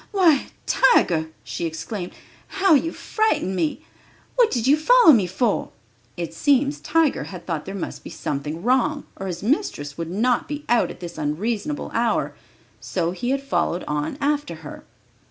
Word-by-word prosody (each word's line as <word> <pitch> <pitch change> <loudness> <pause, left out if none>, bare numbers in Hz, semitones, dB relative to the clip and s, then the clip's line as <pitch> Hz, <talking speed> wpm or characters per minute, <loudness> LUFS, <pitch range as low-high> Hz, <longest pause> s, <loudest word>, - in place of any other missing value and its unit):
"Why, 345 -9 +4 0.2
Tiger," 160 - +3
she 170 - -3
exclaimed, 175 +3 -5 0.3
"how 385 -3 +3
you 320 +3 +3
frightened 430 - 0
me! 175 - -1 0.5
What 485 -3 +5
did 240 -3 -1
you 275 +3 +6
follow 330 +2 +7
me 205 -7 +3
for?" 205 +5 0 0.5
It 170 -2 -4
seems 280 - +2
Tiger 315 -1 +1
had 180 -3 -9
thought 165 -4 -3
there 195 - -6
must 190 - -5
be - - -8
something 150 +4 -4
wrong, 265 +5 +2
or 195 - -5
his 175 -1 -5
mistress 205 - -1
would 165 -1 -3
not 235 +7 +1
be 295 0 -5
out 240 -1 +3
at - - -10
this 175 -1 -7
unreasonable 215 - -2
hour, 230 -1 +1 0.5
so 170 -2 -2
he 245 +7 -3
had 275 +1 0
followed 180 -9 0
on 150 - -3
after 290 - -1
her. - - -9
235 Hz, 165 wpm, -23 LUFS, -, 0.5 s, follow